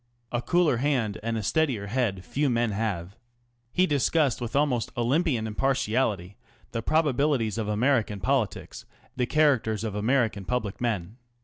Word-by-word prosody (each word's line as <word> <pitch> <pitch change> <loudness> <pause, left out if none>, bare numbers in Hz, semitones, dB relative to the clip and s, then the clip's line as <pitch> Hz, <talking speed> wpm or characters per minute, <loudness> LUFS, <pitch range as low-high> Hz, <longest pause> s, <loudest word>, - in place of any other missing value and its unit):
A 120 - -1
cooler 160 +1 +2
hand 125 -6 0
and 115 +1 -2
a 110 - -3
steadier 115 -1 0
head 100 -4 -1
few 145 0 0
men 120 -2 +1
have. 100 -3 -3 0.6
He 185 - +3
discussed 145 -3 +1
with 120 +1 -4
almost 140 -5 +1
Olympian 125 0 +1
impartiality 110 -5 0 0.3
the 115 - -2
probabilities 140 -6 +1
of 110 - -2
American 110 -1 +1
politics, 120 +2 -2 0.3
the 125 -1 0
characters 130 -9 +2
of 110 -3 -3
American 110 -1 +1
public 110 -2 -3
men. 110 -3 -2
120 Hz, 140 wpm, -26 LUFS, 105-135 Hz, 0.6 s, He